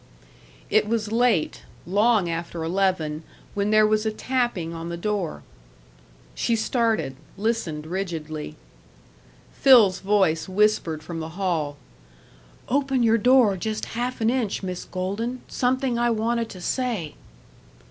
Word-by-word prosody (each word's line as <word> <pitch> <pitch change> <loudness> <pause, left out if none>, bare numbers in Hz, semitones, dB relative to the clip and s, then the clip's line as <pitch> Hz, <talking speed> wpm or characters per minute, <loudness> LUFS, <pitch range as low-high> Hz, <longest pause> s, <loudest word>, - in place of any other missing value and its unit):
It - - +3
was 220 -1 -1
late 230 -8 +2 0.2
long 205 +1 +3
after 165 0 -4
eleven 165 -3 0 0.3
when 200 0 0
there 215 0 +5
was 215 0 +2
a 220 - 0
tapping 240 -8 -1
on 165 0 -6
the 170 - -4
door. 195 -3 -2 0.9
She 235 - 0
started, 220 - 0 0.2
listened 200 -8 -2
rigidly. 160 -4 -4 1.0
Phil's 225 -9 +6
voice 190 -4 +1
whispered 185 -6 +1
from 170 -2 -6
the 160 0 -5
hall: 160 -7 -1 0.9
"Open 270 -1 +1
your 230 0 +4
door 245 -3 +5
just 215 +3 -3
half 245 +1 -3
an 225 +1 +3
inch, 235 -7 -1
Miss 180 -1 -4
Golden. 205 +7 -3
Something 255 -1 0
I 240 0 +2
wanted 230 0 0
to 185 - -10
say." 215 - -2
210 Hz, 125 wpm, -24 LUFS, 170-235 Hz, 1.0 s, Phil's